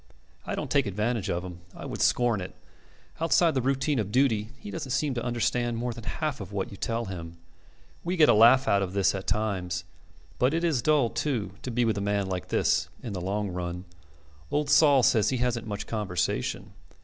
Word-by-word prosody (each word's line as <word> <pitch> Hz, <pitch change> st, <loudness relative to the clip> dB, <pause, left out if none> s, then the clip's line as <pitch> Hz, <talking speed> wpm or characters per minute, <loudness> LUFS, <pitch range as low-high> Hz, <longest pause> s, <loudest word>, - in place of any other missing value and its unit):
I -, -, -2 dB
don't -, -, -5 dB
take 140 Hz, -5 st, +3 dB
advantage 105 Hz, +1 st, -1 dB
of 85 Hz, 0 st, -1 dB
him. 90 Hz, -1 st, -8 dB, 0.2 s
I -, -, -8 dB
would -, -, -5 dB
scorn 120 Hz, -5 st, +2 dB
it. 90 Hz, -, -8 dB, 0.6 s
Outside 165 Hz, 0 st, +3 dB
the 130 Hz, -, +1 dB
routine 135 Hz, +2 st, 0 dB
of 105 Hz, -2 st, -2 dB
duty 115 Hz, -4 st, +2 dB
he 205 Hz, +5 st, -9 dB
doesn't 155 Hz, -5 st, -5 dB
seem 135 Hz, +2 st, 0 dB
to 120 Hz, -1 st, -3 dB
understand 120 Hz, 0 st, 0 dB
more 120 Hz, +1 st, -2 dB
than 115 Hz, -1 st, -10 dB
half 150 Hz, -3 st, -3 dB
of -, -, -8 dB
what 100 Hz, -2 st, -3 dB
you 100 Hz, -, -9 dB
tell 115 Hz, +3 st, -2 dB
him. 85 Hz, -4 st, -7 dB, 0.7 s
We 180 Hz, +2 st, -2 dB
get 155 Hz, -2 st, +6 dB
a -, -, +6 dB
laugh 120 Hz, +5 st, +6 dB
out 100 Hz, -, +3 dB
of 95 Hz, -1 st, -3 dB
this 100 Hz, -1 st, +2 dB
at 95 Hz, -1 st, -5 dB
times; 95 Hz, -4 st, -1 dB, 0.6 s
but 130 Hz, +5 st, +3 dB
it 165 Hz, -, -1 dB
is 155 Hz, -8 st, +1 dB
dull, 145 Hz, -5 st, +3 dB
too, 115 Hz, -11 st, -2 dB
to -, -, -5 dB
be 120 Hz, 0 st, +1 dB
with 110 Hz, -2 st, 0 dB
a -, -, -3 dB
man 100 Hz, 0 st, 0 dB
like 95 Hz, -1 st, -4 dB
this -, -, +1 dB
in 115 Hz, -, -5 dB
the 95 Hz, -, -4 dB
long 100 Hz, +3 st, -2 dB
run. 90 Hz, 0 st, -5 dB, 0.6 s
Old 145 Hz, 0 st, 0 dB
Sol 145 Hz, -3 st, +6 dB
says 110 Hz, -1 st, +4 dB
he 130 Hz, -, 0 dB
hasn't 120 Hz, -2 st, -1 dB
much 105 Hz, -1 st, -4 dB
conversation. 105 Hz, -5 st, -2 dB
115 Hz, 210 wpm, -27 LUFS, 100-135 Hz, 0.7 s, get